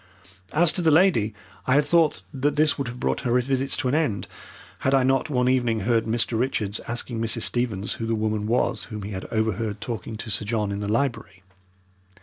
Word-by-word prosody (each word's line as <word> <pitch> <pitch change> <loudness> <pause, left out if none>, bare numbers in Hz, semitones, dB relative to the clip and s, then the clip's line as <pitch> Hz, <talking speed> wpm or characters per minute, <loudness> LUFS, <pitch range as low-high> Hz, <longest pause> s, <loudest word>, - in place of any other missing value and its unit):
As 165 +1 +4
to 180 - -1
the 165 - +3
lady, 155 - +4 0.4
I 130 - +4
had 145 +1 +4
thought 160 0 +2
that 140 +2 0
this 150 0 +3
would 140 - -3
have 120 +1 -7
brought - - -1
her 125 -1 +2
visits 135 +1 -1
to 130 - -1
an 125 - 0
end, 145 -11 0 0.5
had 135 +1 +2
I 135 - +4
not 135 +3 +1
one 125 -3 +1
evening 120 -4 +1
heard 115 +2 +1
Mr. 115 0 +1
Richards 110 -5 -1
asking 120 -1 -2
Mrs. 115 0 +1
Stevens 115 -5 -1
who 115 - -2
the 115 - +1
woman 110 -1 -1
was 120 +3 0
whom 105 -3 -7
he 100 - -6
had 95 -1 -5
overheard 110 -1 -1
talking 115 -1 -5
to 110 0 -6
Sir 100 - +1
John 105 -1 -1
in 100 - -3
the 105 - -3
library. 115 -5 -2
120 Hz, 210 wpm, -24 LUFS, 110-135 Hz, 0.5 s, As